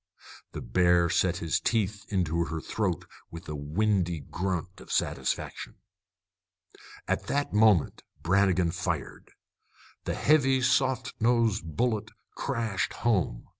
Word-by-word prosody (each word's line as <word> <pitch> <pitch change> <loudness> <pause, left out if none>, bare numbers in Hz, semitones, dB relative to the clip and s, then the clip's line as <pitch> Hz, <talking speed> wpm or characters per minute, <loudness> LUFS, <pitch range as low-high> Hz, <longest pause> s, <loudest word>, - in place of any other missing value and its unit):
The - - -6
bear 85 +6 +3
set 90 -2 +2
his 85 -3 0
teeth 105 -3 -1
into 85 -4 0
her 80 -1 -4
throat 95 0 -2 0.2
with 85 0 -10
a 75 - -4
windy 85 +2 0
grunt 90 +3 -4
of - - -11
satisfaction. - - -2 1.3
At - - -1
that 145 -4 -1
moment 105 -6 +4 0.2
Brannigan 95 -1 +2
fired. - - -4 0.8
The - - -2
heavy 135 -3 +3
soft 130 0 +1
nosed 110 -8 +1
bullet 115 -3 0 0.3
crashed 110 -4 -2
home. 95 - 0
95 Hz, 115 wpm, -28 LUFS, 85-115 Hz, 1.3 s, moment